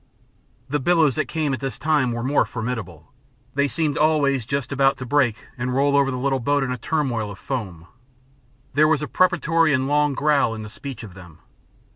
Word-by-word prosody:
The 150 +2 -1
billows 160 -3 +3
that - - -1
came 155 -4 -1
at 130 - -3
this 135 -1 -4
time 150 -5 +1
were 120 0 -3
more 140 +3 +2
formidable. 110 -9 -6 0.4
They 140 +1 +2
seemed 155 0 -1
always 140 -6 +2
just 140 -1 -2
about 135 0 +2
to 130 - -6
break 120 -4 +1
and 125 +1 -2
roll 140 +1 +2
over 140 -1 +3
the 130 - -3
little 135 +1 0
boat 145 +3 +1
in 130 - -2
a 125 - -2
turmoil 120 -6 -1
of 100 - -9
foam. 95 -11 -5 0.9
There 155 +3 +4
was 155 -2 +1
a - - -3
preparatory 165 -4 +2
and 130 +1 -1
long 145 0 +2
growl 145 -6 +2
in 110 - -7
the 105 - -8
speech 130 +1 -8
of 100 -5 -10
them. 90 -5 -14
135 Hz, 200 wpm, -22 LUFS, 120-150 Hz, 0.9 s, There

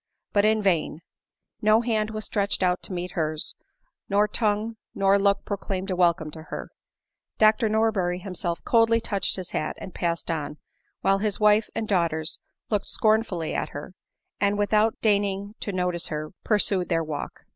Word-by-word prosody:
But 205 0 +4
in 215 0 +3
vain; 170 -4 +1 0.6
no 215 +1 +5
hand 220 -3 0
was 215 -1 -4
stretched 200 -2 0
out 180 -1 +2
to - - -8
meet 180 0 -4
hers, 155 -2 -1 0.6
nor 205 +1 +3
tongue 215 +1 0 0.2
nor 195 0 +4
look 200 0 +2
proclaimed 195 -1 -3
a - - 0
welcome 170 -3 +2
to 160 - -9
her; - - -6 0.7
Dr 215 +1 +4
Nor 220 +1 +3
berry 180 -4 -1
himself 180 -2 -4
coldly 230 -1 +4
touched 200 -3 -1
his 185 -2 -6
hat, - - -2
and 190 - -8
passed 170 0 -2
on, 150 -2 -3 0.4
while 195 0 +3
his 210 -1 -1
wife 210 0 +4
and 220 - -2
daughters 170 -5 0 0.3
looked 205 -2 0
scornfully 215 -7 +1
at - - -2
her, 150 +5 -8 0.5
and, 200 0 +2
without 210 +2 +2
deigning 200 -1 +1
to 205 - -3
notice 180 -2 -1
her, 155 0 -4
pursued 200 -4 +1
their 165 -2 +1
walk. 150 -2 -5
200 Hz, 165 wpm, -25 LUFS, 175-215 Hz, 0.7 s, no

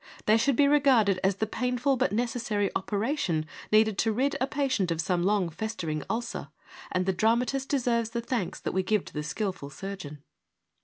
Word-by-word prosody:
They 215 - +5
should 255 +4 +2
be 280 +3 +5
regarded 260 -10 +4
as 190 0 +3
the 220 - -1
painful 250 +4 0
but 195 - +1
necessary 225 -3 -1
operation, 200 - -1 0.3
needed 215 -1 +4
to 225 - +2
rid 260 +6 0
a 260 - +2
patient 265 -10 0
of 165 -1 -1
some 175 +2 0
long 195 0 +2
festering 170 -4 -3
ulcer, 230 +1 -3 0.4
and 185 0 0
the 190 - +1
dramatist 240 +7 +1
deserves 235 -4 +1
the 235 +1 -3
thanks 235 -6 -2
that - - -2
we 190 - +2
give 210 +1 0
to - - -12
the 150 - -2
skilful 150 0 -3
surgeon. 150 -4 -7
215 Hz, 185 wpm, -28 LUFS, 185-245 Hz, 0.4 s, They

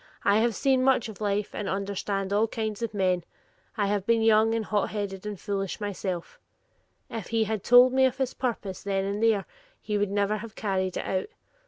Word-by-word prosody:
I 200 +1 +5
have 230 -1 +1
seen 265 -2 +2
much 260 -4 +3
of 215 - -11
life, 205 0 -1
and 205 - -3
understand 195 0 -2
all 215 +2 +3
kinds 220 -1 -4
of 230 - -2
men. 185 -4 +1 0.5
I 205 - +2
have 200 -1 0
been 230 +2 +2
young 220 0 +4
and 225 -1 -1
hot 205 -1 0
headed 200 -1 -4
and 205 -3 -5
foolish 195 0 -3
myself,' 190 -4 -4 0.7
if 225 -5 -6
he 225 -1 +1
had 220 -2 -3
told 245 +1 +7
me 265 0 +5
of 260 -1 0
his 265 -2 -1
purpose 215 -7 -3
then 195 -1 -1
and 200 +2 -2
there, 220 -3 +3 0.3
he 210 -1 -2
would 205 -1 +1
never 205 +1 +1
have 220 0 -9
carried 190 -3 -1
it - - -3
out. 190 0 -1
210 Hz, 205 wpm, -27 LUFS, 195-225 Hz, 0.7 s, told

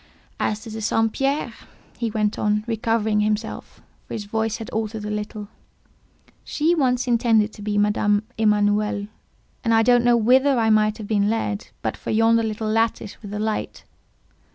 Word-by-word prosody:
"As 215 0 -1
to 225 - -9
the 220 0 -6
St. 225 +1 +1
Pierre," 270 -3 -1 0.4
he 235 -1 -2
went 210 -1 -1
on, 210 0 +1
recovering 225 -2 0
himself, 215 +1 -3 0.2
for - - -5
his 210 -2 -5
voice 220 +1 -1
had 225 - -7
altered 220 -1 -3
a 210 - -3
little, 210 0 -5 1.0
"she 315 +3 +1
once 255 -6 +1
intended 225 -3 +2
to - - -12
be 205 0 -2
Madame 205 0 +2
Emanuel; 210 -1 +1 0.6
and 230 -1 +2
I 225 - +4
don't 245 0 +4
know 240 -1 +4
whither 260 +4 +4
I 225 -1 +3
might 215 0 +3
have 215 -3 -7
been 205 -1 +1
led, 215 -1 -2 0.2
but - - -1
for - - -8
yonder 225 +1 +3
little 220 0 -3
lattice 220 -1 -1
with 205 - -9
the 205 - -5
light. 215 0 -3
220 Hz, 175 wpm, -22 LUFS, 210-230 Hz, 1.0 s, I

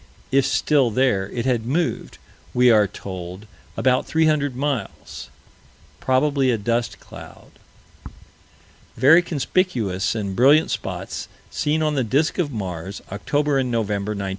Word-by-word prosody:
If 135 0 +3
still 140 -5 +2
there, 105 -5 +1
it 120 -1 -4
had 125 -4 +1
moved, 160 +5 -2 0.4
we 125 0 +5
are 105 -2 +4
told, 95 0 -8 0.3
about 130 -1 +1
300 155 -4 +1
miles 135 -6 -4 0.7
"probably 135 0 +1
a 120 - +2
dust 115 +3 -2
cloud." - - -13 1.5
Very 145 +8 +6
conspicuous 135 - -1
and 100 -3 -3
brilliant 145 +7 +4
spots - - -5 0.2
seen 155 +1 0
on 155 -1 +1
the 135 -3 0
disk 145 - 0
of 155 -5 0
Mars, 95 -4 -6
October 145 +7 0
and 130 -1 -1
November, 105 -3 -1
1911. 100 -2 -4
125 Hz, 130 wpm, -22 LUFS, 105-145 Hz, 1.5 s, Very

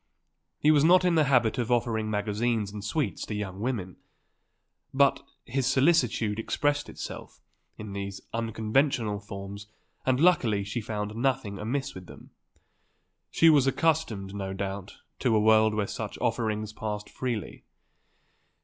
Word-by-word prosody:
He 150 - +4
was 145 -2 +4
not 180 +3 +6
in 180 - +3
the 155 -2 +4
habit 125 -3 +2
of 120 0 -1
offering 110 -2 +1
magazines 105 +1 -1
and 105 -1 -7
sweets 145 +8 -2
to 105 - -4
young 100 -2 -5
women. 105 -6 -3 1.0
But 140 0 +4 0.2
his 130 +1 -1
solicitude 130 -8 +2
expressed 145 +5 0
itself - - -8 0.4
in 105 -2 -7
these 100 -1 -5
unconventional 115 0 0
forms 100 0 -8 0.4
and 130 0 +1
luckily 130 - +3
she 100 +4 -4
found 105 0 -4
nothing 120 -5 -1
amiss 130 +6 -2
with 90 -1 -10
them. - - -14 1.0
She 165 - +4
was 140 -3 +4
accustomed, 135 -11 0
no 95 -1 -4
doubt, 95 0 -5 0.2
to 120 -4 +2
a - - +4
world 110 0 +4
where 105 -1 0
such - - -5
offerings 110 -2 -1
passed 105 -1 -4
freely. 120 -5 -4
110 Hz, 140 wpm, -28 LUFS, 105-135 Hz, 1.0 s, not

